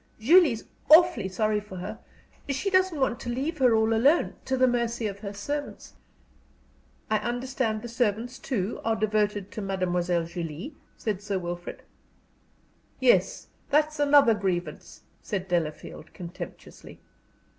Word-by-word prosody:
Julie's 285 -1 +5 0.3
awfully 305 - +6
sorry 210 +3 0
for 210 -2 -11
her. 195 +5 -6 0.5
She 335 +9 -1
doesn't 370 -4 +2
want 265 -3 0
to 240 - -6
leave 280 +6 -3
her 250 -3 +5
all 220 +1 +2
alone 275 +9 +3
to 265 - 0
the 255 - +5
mercy 235 -1 -1
of 200 -1 -4
her 200 -1 -6
servants 285 +9 -5 0.6
" - - -31
"I 215 - +3
understand 240 -2 -2
the - - -5
servants, 235 +2 -1
too, 230 -6 -3
are 225 0 +1
devoted 210 -2 0
to 215 - -6
Mademoiselle 180 -3 0
Julie?" 170 - -6 0.2
said 205 -3 -3
Sir 205 -2 -2
Wilfrid. 175 -1 -6 1.2
"Yes, - - +2 0.2
that's 305 +1 +2
another 285 -5 +6
grievance," 180 -6 -4 0.2
said 190 -2 -4
Delafield, 165 -4 -3
contemptuously. 175 0 -10
220 Hz, 135 wpm, -27 LUFS, 190-260 Hz, 1.2 s, awfully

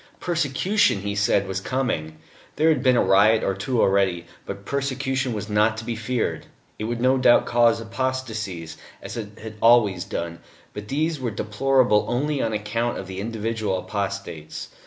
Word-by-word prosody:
Persecution, 170 - +1
he 100 0 -3
said, 100 -1 +2
was 95 0 -3
coming. 95 -10 -2 0.4
There 160 +2 +3
had 155 -5 +2
been 130 -1 +4
a - - +4
riot 105 +3 +4
or 95 - +1
two 115 +6 -2
already. 95 -4 +2 0.2
But 100 - -7
persecution 135 -1 -1
was 105 -2 -4
not 105 +1 +2
to 115 - -5
be 120 -1 -3
feared. 115 +1 -2 0.3
It 110 - -3
would 120 +1 -3
no 130 +2 +3
doubt 120 -1 +5
cause 120 -1 +3
apostasies, 110 -9 -4 0.3
as - - -7
it 105 -3 -7
had 110 -1 -8
always 110 -6 +5
done, 85 0 -5 0.3
but 105 0 -7
these 155 +4 -1
were 125 -2 -2
deplorable 110 +2 +2
only 140 +4 0
on 115 - 0
account 110 +3 -2
of - - -6
the 95 0 -7
individual 110 -2 -2
apostates. 100 -6 -5
110 Hz, 170 wpm, -23 LUFS, 100-130 Hz, 0.4 s, doubt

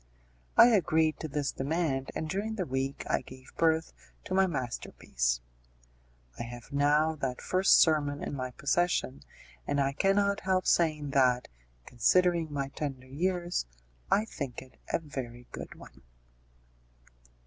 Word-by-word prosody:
I 240 - +9
agreed 160 -7 +2
to 160 - -4
this 145 -1 -2
demand, 135 -2 -1
and 160 - -3
during 205 +6 -2
the 190 -4 -2
week 135 0 -2
I - - +1
gave 130 0 -14
birth 160 0 +1 0.3
to - - -5
my 190 0 +4
masterpiece. 65 - -2 1.0
I - - -3
have 120 +3 -8
now 150 +3 +3
that 130 -3 -3
first 185 +1 +4
sermon 145 -3 +2
in - - -4
my 130 -2 -3
possession, 140 +1 0 0.5
and 145 - 0
I 135 0 +2
cannot 200 +4 +2
help 185 -1 0
saying 155 -4 +2
that, 125 -2 +3 0.4
considering 170 +6 +2
my 140 -2 -2
tender 135 -2 -5
years, 175 - -1 0.4
I 210 - +3
think 140 - -6
it 130 - -20
a - - +3
very 125 -6 -7
good - - -8
one. 65 +2 -15
145 Hz, 140 wpm, -30 LUFS, 130-175 Hz, 1.0 s, I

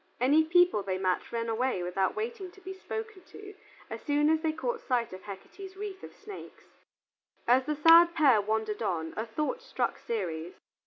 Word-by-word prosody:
Any 285 +6 +4
people 355 - +4
they 190 -1 -2
met 185 -1 -1
ran 230 0 -2
away 225 -4 -1
without 185 +2 -1
waiting 435 -3 -4
to 390 - -18
be 380 +1 -7
spoken 440 +1 -7
to, 405 -1 -12 0.3
as - - -7
soon 295 +1 +2
as 320 0 +2
they 320 -1 +1
caught 480 +9 -3
sight 240 -6 -1
of 185 - -9
Hecate's 375 - -10
wreath 395 -2 -6
of - - -11
snakes. 415 -2 -11 0.8
As 255 +2 +4
the 300 - 0
sad 330 +3 +7
pair 270 -9 +5
wandered 215 +1 -2
on, 165 -6 -2
a 220 +2 -3
thought 300 - -3
struck 485 - -2
Ceres. 175 -7 -4
290 Hz, 180 wpm, -29 LUFS, -, 0.8 s, sad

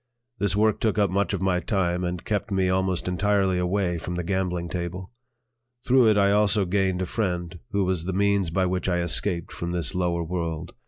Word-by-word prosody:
This 100 -2 +1
work 110 0 +2
took 110 -2 0
up 100 -3 +2
much 100 +1 0
of - - -2
my 90 -2 +2
time 90 -2 -1
and 90 -1 -4
kept 105 -2 -2
me 95 -2 +1
almost 95 -1 0
entirely 95 0 +1
away 90 -1 0
from 90 +2 -5
the 90 - -2
gambling 90 -1 -1
table. 90 +2 -5 0.7
Through 125 -2 +5
it 105 -1 +4
I 100 0 +4
also 105 0 +3
gained 95 0 0
a - - -1
friend 90 -3 -3
who 100 -2 0
was 90 -3 -1
the 95 - -2
means 100 -1 +1
by 95 +3 +1
which 90 +1 -1
I 90 -1 +1
escaped 85 0 0
from 85 0 -4
this 85 0 0
lower 90 -2 0
world. 85 0 -4
95 Hz, 205 wpm, -25 LUFS, 90-100 Hz, 0.7 s, Through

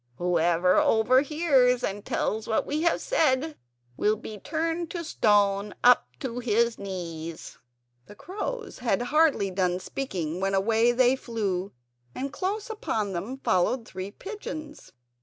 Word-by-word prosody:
whoever 175 +2 +2
overhears 255 +2 +3
and 200 +1 -3
tells 220 +1 -1
what 220 - +1
we 300 +2 -2
have 340 0 +2
said 310 - +1 0.4
will 210 +1 +2
be 215 -1 -9
turned 330 - -2
to 345 -1 -4
stone 205 -7 +2
up 250 0 +6
to 245 -2 -4
his 235 0 +1
knees." 170 -4 -6 0.5
The 205 - -12
crows 425 - -6
had 240 -3 0
hardly 285 -7 +2
done 180 -1 0
speaking 185 - -4
when 195 +1 0
away 225 +4 +3
they 250 +1 +4
flew. 200 -7 -3 0.4
And 275 +2 -4
close 400 +6 -2
upon 220 - -2
them 200 +10 -4
followed 220 +6 +1
three 190 +1 -6
pigeons. 310 - -8
230 Hz, 135 wpm, -27 LUFS, 195-295 Hz, 0.5 s, up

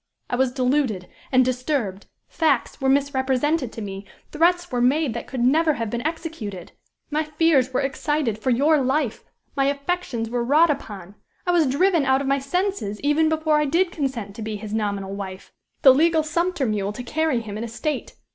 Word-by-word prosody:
I - - +1
was 260 0 +1
deluded 255 -7 0 0.2
and 255 -1 +5
disturbed; 250 -6 -2 0.2
facts 295 -7 0
were 265 - +2
misrepresented 270 0 +1
to 225 - -6
me, 195 -1 -6 0.3
threats 350 +2 +2
were 245 -1 0
made 270 +1 +2
that - - -6
could 260 -3 -4
never 310 +6 +3
have 230 -5 -4
been 240 - -2
executed; 310 - -6 0.4
my 305 +1 +1
fears 305 -4 +2
were 255 - 0
excited 270 -4 -1
for 260 - -1
your 290 +5 +4
life; 265 -2 -1 0.3
my 275 -1 +2
affections 280 -4 -2
were 240 +1 -1
wrought 300 +6 +4
upon; 200 -9 -6 0.3
I 355 - +2
was 335 -4 +3
driven 335 +4 +2
out 265 0 +3
of 275 - -3
my 275 +1 +2
senses 280 - -2
even 295 +2 +2
before 315 -1 +2
I 300 - +2
did 340 +5 +1
consent 250 - -3
to - - -6
be 215 0 -4
his 210 0 -7
nominal 200 -3 -2
wife 190 -1 -7 0.3
the 265 - +9
legal 320 +3 +3
sumpter 340 -1 0
mule 210 -2 -1
to 245 - -7
carry 305 -2 0
him 210 -2 -7
an 215 - -4
estate. 265 +5 -4
270 Hz, 185 wpm, -23 LUFS, 230-310 Hz, 0.4 s, the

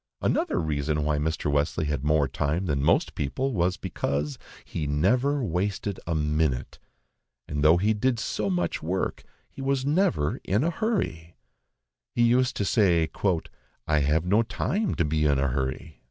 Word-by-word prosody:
Another - - 0
reason 75 -1 -1
why 75 0 +1
Mr. 80 0 -1
Wesley 75 +2 0
had 75 -2 -2
more 75 -1 +3
time 75 +8 -1
than 70 -5 0
most - - +2
people 130 - -2
was, 90 -3 +1
because 70 0 -3 0.3
he 75 - -4
NEVER 125 - +2
WASTED 95 +1 -2
A 85 - 0
MINUTE, 75 -4 -1 0.7
and 75 -1 -2
though 80 +3 +6
he 105 +5 +2
did 120 +3 +1
so 105 -2 -2
much 90 -2 -1
work, 90 +4 -2 0.3
he - - -11
was 135 -1 0
never 155 - +1
in 105 +8 +1
a 170 - +1
hurry. 155 - -2 0.8
He 120 - +3
used 125 +2 +3
to 100 - 0
say, 90 -6 +3 0.8
"I 75 -1 +3
have 75 +4 +1
no 100 +5 +4
time 200 - -1
to 85 - +1
be 75 0 0
in 70 -2 +3
a 70 0 +1
hurry." 65 +4 -3
80 Hz, 165 wpm, -26 LUFS, 75-110 Hz, 0.8 s, though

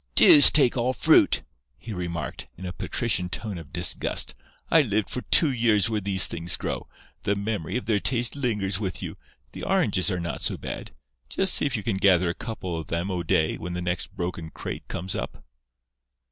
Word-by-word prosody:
"Deuce 145 - +10
take 140 -5 +4
all 125 +1 0
fruit!" - - +3 0.3
he 110 +7 -8
remarked, 85 -7 -5
in 95 - -9
a 90 - -5
patrician 95 -7 -2
tone 100 -1 -5
of 80 -4 -13
disgust. - - +1 0.4
"I 165 - +6
lived 110 -6 -2
for 125 - -4
two 155 +1 +3
years 115 -4 +1
where 105 -1 -1
these 95 0 +3
things 85 +1 -1
grow. - - -5 0.3
The 100 0 -1
memory 100 -1 -3
of 125 - -6
their 105 -2 +1
taste 120 +3 0
lingers 105 -8 -2
with 95 -4 -4
you. - - -6 0.4
The - - -9
oranges 90 +2 +1
are 90 -3 -2
not 85 0 -5
so - - -1
bad. - - -7 0.4
Just 190 -1 +1
see - - +2
if 130 -4 -2
you 105 - -6
can 105 -2 -2
gather 95 -2 +3
a - - -6
couple 95 -5 -6
of 80 - -8
them, 85 +4 -3
O'Day, 80 -3 0
when 90 +1 -6
the 90 - -4
next 90 +1 -3
broken 85 -2 -5
crate - - -8
comes 90 +2 -3
up." - - -6
100 Hz, 195 wpm, -25 LUFS, 90-115 Hz, 0.4 s, Deuce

